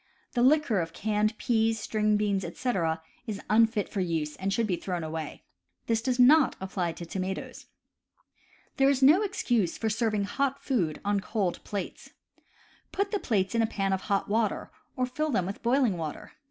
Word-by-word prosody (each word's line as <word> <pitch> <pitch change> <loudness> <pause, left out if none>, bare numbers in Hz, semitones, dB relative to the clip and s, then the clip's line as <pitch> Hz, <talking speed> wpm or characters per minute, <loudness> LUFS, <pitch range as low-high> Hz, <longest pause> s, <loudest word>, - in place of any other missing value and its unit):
The 240 - 0
liquor 260 -5 +4
of 165 0 -5
canned 215 +1 0
peas, 225 -1 +1
string 210 0 +1
beans, 200 -2 0
etc., 165 -10 -1 0.2
is 210 -2 -4
unfit 220 -1 +3
for 205 - -4
use 160 -4 -2
and 195 +1 -2
should 230 +3 +1
be 190 -4 0
thrown 175 -1 -4
away; 155 -1 -5 0.4
this 225 -1 +1
does 250 +1 0
not 270 +3 +6
apply 185 -3 -2
to 170 - -8
tomatoes. 190 +2 -5 1.1
There 270 -1 +5
is 275 -1 +1
no 310 +9 +7
excuse 240 - 0
for 220 -1 -1
serving 215 -2 0
hot 275 +7 -1
food 180 - 0
on 205 0 +2
cold 195 -2 -2
plates. 200 -2 -6 0.8
Put 400 0 -1
the 415 - 0
plates 195 - 0
in 230 - +2
a 225 - +2
pan 195 -2 -1
of 190 - -1
hot 200 -1 -1
water, 215 0 0 0.2
or 255 -2 +1
fill 305 +5 -2
them 205 -10 +1
with 195 +2 -6
boiling 240 -5 +2
water. 155 -2 -6
215 Hz, 180 wpm, -28 LUFS, 190-245 Hz, 1.1 s, no